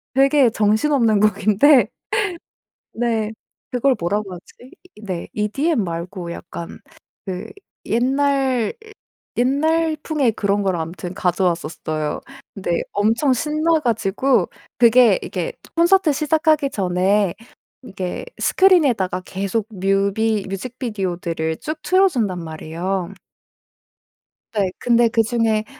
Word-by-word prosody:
되게 275 -1 +5
정신없는 220 +1 +2
곡인데. 215 +5 +4 1.1
네. 225 -2 -1 0.4
그걸 255 +2 +2
뭐라고 195 +2 -2
하지. 215 +8 -15 0.2
이 210 - -16
네. 185 -5 -5
EDM 230 - 0
말고 170 +1 -5
약간 170 0 -8 0.5
그 190 +2 -4 0.4
옛날, 265 0 +1 0.6
옛날풍의 305 0 +1
그런 205 -1 0
걸 190 -2 0
아무튼 170 +2 -5
가져왔었어요. 165 -4 -1 0.3
근데 185 -4 -1
엄청 225 +7 +2
신나 310 +4 +1
가지고 240 +1 +1 0.3
그게 235 -3 +6
이게 180 -3 -4 0.2
콘서트 345 -1 +4
시작하기 305 -1 +2
전에 190 0 +1 0.5
이게 190 -7 -5 0.2
스크린에다가 270 - +3
계속 200 +3 -2
뮤비 200 +2 0
뮤직비디오들을 190 -7 -3
쭉 310 +1 -5
틀어 380 +1 +4
준단 215 - -2
말이에요. 170 +4 -4 1.4
네. 195 -3 +1
근데 235 -1 +3
그중에 225 -1 +1
215 Hz, 235 characters per minute, -20 LUFS, 190-270 Hz, 1.4 s, 그게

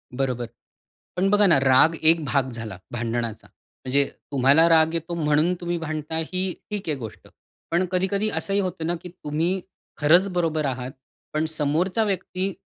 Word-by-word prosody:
बरोबर 125 -3 -1 0.7
पण 190 +2 +2
बघा 205 0 +4
ना 165 - +5
राग 135 +5 +5
एक 160 0 +4
भाग 135 0 0
झाला 115 -5 -7
भांडणाचा. 115 -2 -3
म्हणजे 140 +2 -2 0.3
तुम्हाला 140 +4 +5
राग 160 0 +5
येतो 165 +1 -3
म्हणून 155 +2 +2
तुम्ही 175 0 -2
भांडता 155 -1 -4
ही 185 +3 -1 0.2
ठीक 205 -5 -4
आहे 150 - 0
गोष्ट. 115 -5 -9 0.4
पण 175 +2 +2
कधी 185 +1 +1
कधी 205 +2 0
असंही 200 -1 -1
होतं 180 -4 -2
ना 175 - 0
की 180 - -7
तुम्ही 170 +2 -2 0.4
खरंच 170 +6 +4
बरोबर 160 -3 0
आहात 130 -1 -3 0.4
पण 155 +1 0
समोरचा 160 +7 0
व्यक्ती 190 -1 -2
160 Hz, 160 wpm, -24 LUFS, 140-180 Hz, 0.7 s, ना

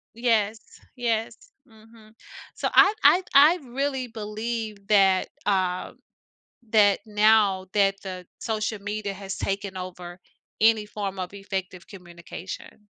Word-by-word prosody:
Yes, 225 -2 +1 0.4
yes, 230 -2 -1 0.3
mhm. 220 -1 -19 0.4
So - - -1
I 415 - +7
I 365 +1 +6
I 295 +5 +7
really 265 0 -3
believe 215 -1 -5
that, 195 -3 +4 0.2
uh, 185 -3 0 0.8
that 205 -3 +4
now, 210 -3 +3
that 195 -1 +2
the 185 -2 -7
social 215 -1 -2
media 205 0 -4
has 195 0 -6
taken 195 -1 -3
over 180 -1 -8 0.4
any 220 -1 +4
form 200 -2 -5
of 185 +2 -5
effective 190 -2 -6
communication. 175 -1 -10
210 Hz, 115 wpm, -25 LUFS, 190-225 Hz, 0.8 s, I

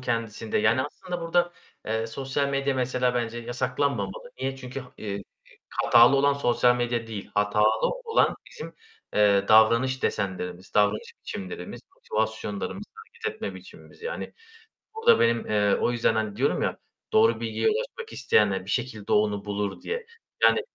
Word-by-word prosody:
kendisinde, 115 -3 -2
yani, 115 +5 +3
aslında 175 +4 -6
burada, 175 +1 +1 0.3
eee, 110 +1 -1
sosyal 135 +4 -2
medya 140 0 0
mesela 125 -1 0
bence 120 -1 -2
yasaklanmamalı. 120 -3 -2
Niye? 135 0 -2
Çünkü 130 +1 -7
ha 125 -1 -13
eee, 100 -2 -4 0.5
hatalı 120 +4 +6
olan 140 +1 +4
sosyal 125 -3 +3
medya 120 -1 -1
değil, 110 -3 -7
hatalı 105 +1 +3 0.2
olan 450 +1 +2
bizim, 460 - -9 0.4
eee, 100 -1 +4
davranış 115 +4 +5
desenlerimiz, 95 -2 -3
davranış 105 0 +2
biçimlerimiz, 90 -2 -7
motivasyonlarımız, 110 - -3
hareket 450 0 -6
etme - - -5
biçimimiz - - -14
yani. 485 +2 -5 0.6
Burada 450 +1 +4
benim, 115 0 +2
eee, 105 -1 +2
o - - +2
yüzden, 115 -1 +2
hani, 110 -2 -2
diyorum 135 +5 +1
ya, - - -1 0.3
"Doğru 445 +1 +4
bilgiye - - 0
ulaşmak 470 0 -4
isteyenler 100 -3 +2
bir 100 - -6
şekilde 115 -4 -2
onu 105 -1 +2
bulur." 100 -1 -3
diye. 465 +1 -4 0.4
Yani, - - +6
120 Hz, 145 wpm, -26 LUFS, 105-140 Hz, 0.6 s, hatalı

